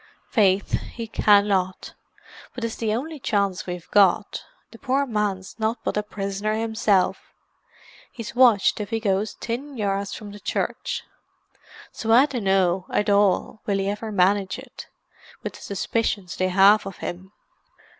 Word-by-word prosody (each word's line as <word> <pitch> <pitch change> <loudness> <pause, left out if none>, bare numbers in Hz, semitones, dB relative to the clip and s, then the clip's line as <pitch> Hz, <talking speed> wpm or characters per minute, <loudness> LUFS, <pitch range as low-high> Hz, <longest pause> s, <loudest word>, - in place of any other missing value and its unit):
"Faith, 200 -3 +2 0.2
he 230 - -4
cannot. 200 -4 +2 0.6
But 250 - -6
'tis 230 -1 -3
the 220 -2 -1
only 305 +5 -5
chance 200 -7 -1
we've 180 -1 -6
got. 205 +1 +3 0.3
The 230 - -14
poor 275 +1 +1
man's 210 -4 -3
nothing 220 +1 -1
but - - -2
a 210 - +1
prisoner 205 0 -3
himself; 220 -4 0 0.8
he's 230 -3 -7
watched 240 -6 +4
if 205 -1 -4
he 225 0 -1
goes 205 -1 -1
tin 265 +4 -5
yards 200 -1 -2
from 205 -1 -9
the 205 - -10
church. - - -3 0.9
So 225 - -3
I 250 +5 +7
dunno, 190 -8 +1
at 210 0 +1
all, 200 +1 +2
will 200 -1 +1
he 195 0 -1
ever 215 +2 -5
manage 195 0 +2
it, - - -11 0.6
with - - -4
the - - -13
suspicions 200 -1 -2
they 185 0 0
have 195 +2 +5
of 195 - -8
him." 185 +2 -7
205 Hz, 150 wpm, -24 LUFS, 195-225 Hz, 0.9 s, I